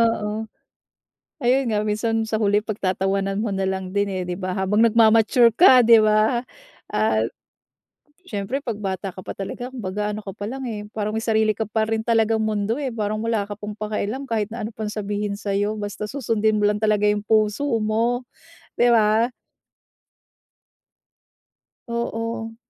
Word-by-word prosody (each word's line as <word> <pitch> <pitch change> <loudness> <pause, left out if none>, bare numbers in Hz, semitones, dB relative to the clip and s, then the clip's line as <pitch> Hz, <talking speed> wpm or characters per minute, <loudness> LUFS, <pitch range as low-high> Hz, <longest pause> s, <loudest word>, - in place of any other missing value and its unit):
oo. 210 -1 -3 1.1
Ayun 260 +2 +3
nga 210 - +1
minsan 220 +2 0
sa 220 - 0
huli, 205 -1 +2
pagtatawanan 195 -1 -1
mo 225 - -1
nalang 190 -1 -2
din, 200 0 +2
eh, 185 - -2
'di 180 0 -3
ba, 185 -1 -3
habang 195 +3 +2
nagma-mature 230 +1 +5
ka, 260 -8 +8
'di 230 0 +7
ba? 215 +3 +2 0.5
Ah, 110 +1 +2 1.0
siyempre 210 +6 -3
'pag 235 -6 -4
bata 195 0 -3
ka 185 - -10
pa - - -5
talaga, 245 +6 -6
kumbaga 210 -3 -3
ano 215 - -5
ka 200 -2 -8
pa 205 - -6
lang, 265 0 -5
eh, 210 -2 -5
parang 215 0 -2
may 225 - -2
sarili 220 -1 +2
ka 220 - -1
pa 220 +1 -1
rin 220 0 -1
talagang 225 -1 +2
mundo, 215 +1 -1
eh, 275 -3 -3
parang 215 0 -2
wala 220 -3 -1
ka 205 - -6
pang 210 0 -6
pakialam 215 +5 -3
kahit 215 -2 -1
na - - -5
ano - - -6
pang 215 -1 -3
sabihin 205 -1 -3
sa'yo 205 +1 -1
basta 205 0 -5
susundin 220 -5 0
mo 205 - +4
lang 210 - +1
talaga 210 -1 +3
'yung 210 0 0
puso 215 +4 +2 0.2
mo, 230 +3 0 0.5
'di 240 0 +5
ba? 225 +1 +3 2.6
Oo. 230 -1 -3
215 Hz, 165 wpm, -22 LUFS, 205-230 Hz, 2.6 s, ka